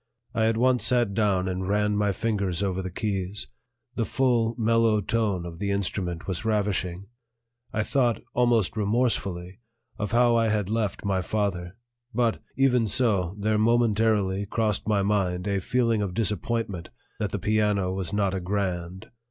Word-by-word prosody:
I 115 -2 +2
at 115 0 +1
once 125 +1 +3
sat 120 -5 +2
down 100 -3 +1
and 95 0 -2
ran 105 +1 +1
my 105 -1 +2
fingers 100 -3 -1
over 95 -1 -1
the 95 - -4
keys; 100 +1 -2 0.5
the 120 - -1
full, 120 -2 +1
mellow 115 -1 +3
tone 105 -4 0
of 85 -1 -8
the 100 0 -2
instrument 90 -3 -2
was 95 0 -3
ravishing. 100 -4 -1 0.7
I 110 0 0
thought, 120 -2 +1
almost 120 -6 +2
remorsefully, 100 -4 -1 0.4
of 105 0 -2
how 120 0 +4
I 115 -1 +3
had 105 -3 0
left 110 -2 -1
my 95 -2 +1
father; 95 -2 -2 0.4
but, 120 -2 +1 0.2
even 125 -4 +3
so, 100 -7 +1
there 105 +1 +1
momentarily 110 -4 +2
crossed 110 -1 -1
my 105 -2 +2
mind 95 -3 0
a 100 -1 +1
feeling 115 +2 +1
of 95 -3 -3
disappointment 105 -3 -2 0.3
that 105 - -1
the 105 - -3
piano 105 -1 +1
was 95 -2 -4
not 100 -2 +1
a 95 - -1
grand. 90 -1 -3
105 Hz, 160 wpm, -26 LUFS, 95-115 Hz, 0.7 s, how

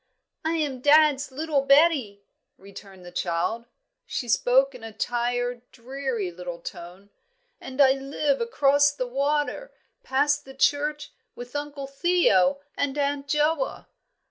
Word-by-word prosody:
"I 320 +1 0
am 295 -5 -2
dad's 290 -1 +4
little 295 +1 0
Betty," 275 -8 +3 0.3
returned 195 -1 -13
the 175 - -10
child. 180 +6 -2 0.4
She 245 - -4
spoke 260 +4 +3
in 250 -3 -12
a 225 - -7
tired, 245 +2 -2
dreary 250 -5 -4
little 175 0 -7
tone, 180 +3 -10 0.5
"and 260 +1 -9
I 270 -2 +7
live 275 +1 -1
across 285 - +3
the 270 -3 -4
water, 290 - -1 0.3
past 290 - +1
the 270 0 -13
church, 295 +2 0 0.2
with 245 +3 -10
Uncle 290 -1 -4
Theo 275 - +2
and 285 0 -2
Aunt 285 0 -1
Joa." 300 - 0
275 Hz, 130 wpm, -25 LUFS, 235-290 Hz, 0.5 s, I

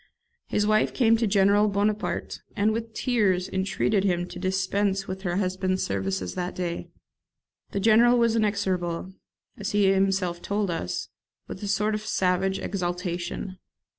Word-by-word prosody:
His 210 - +1
wife 215 0 +2
came 230 -3 +4
to 230 -1 +1
General 200 +1 +4
Bonaparte, 210 +2 -1
and 210 +2 +2
with 225 +1 -3
tears 200 -8 +1
entreated 195 +1 0
him 175 -2 0
to 180 - -8
dispense 195 +1 0
with 190 0 -5
her 175 -3 -2
husband's 185 0 0
services 95 -2 -2
that 180 0 -4
day. 175 -2 -4 0.8
The 200 - -2
General 230 +4 +5
was 230 -1 +3
inexorable, 190 -4 -1 0.5
as 205 +1 -3
he 200 -2 +4
himself 190 -3 0
told 200 -2 -1
us, 125 - -3 0.4
with - - -8
a 205 - -4
sort 210 +2 +1
of 210 - -2
savage 190 -2 +1
exaltation. 180 0 -3
195 Hz, 145 wpm, -26 LUFS, 180-210 Hz, 0.8 s, General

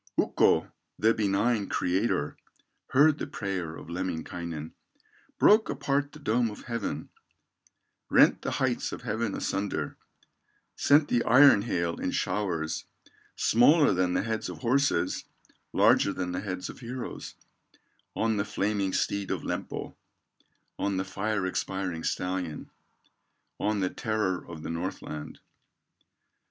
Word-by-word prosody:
Ukko, - - +3 0.3
the 110 +1 +4
benign 105 +1 +1
Creator, 90 -5 0 0.5
Heard 150 +3 +4
the - - -3
prayer 95 - -4
of - - -10
Lemminkainen, 85 -2 -4 0.7
Broke 215 +1 +5
apart 140 +1 -1
the - - -12
dome 120 -4 +1
of 105 - -10
heaven, 115 -3 -4 1.0
Rent - - +5
the - - -2
heights 130 -2 0
of - - -7
heaven 110 -2 -2
asunder, 95 -7 -2 0.8
Sent 145 +1 +4
the 120 - +2
iron 130 -3 +7
hail 85 -6 -1
in - - -1
showers, 85 -6 -1 0.5
Smaller 145 +6 +5
than 90 0 +1
the - - +1
heads 110 0 -2
of - - -7
horses, 130 -5 +1 0.5
Larger 100 - +4
than 90 -1 -3
the 90 +1 -3
heads 95 -2 -4
of - - -9
heroes, 125 +1 -6 0.8
On 110 -1 +1
the 100 - +1
flaming 100 -2 -1
steed 100 -1 -1
of - - -2
Lempo, - - -4 0.9
On 100 -1 0
the 95 - -1
fire 100 +1 -2
expiring 95 -2 -2
stallion, 90 -4 -3 0.9
On 105 -1 0
the 95 - +1
terror 105 -5 -1
of 80 -2 -9
the - - -4
Northland. 80 -3 -5
100 Hz, 125 wpm, -28 LUFS, 90-115 Hz, 1.0 s, iron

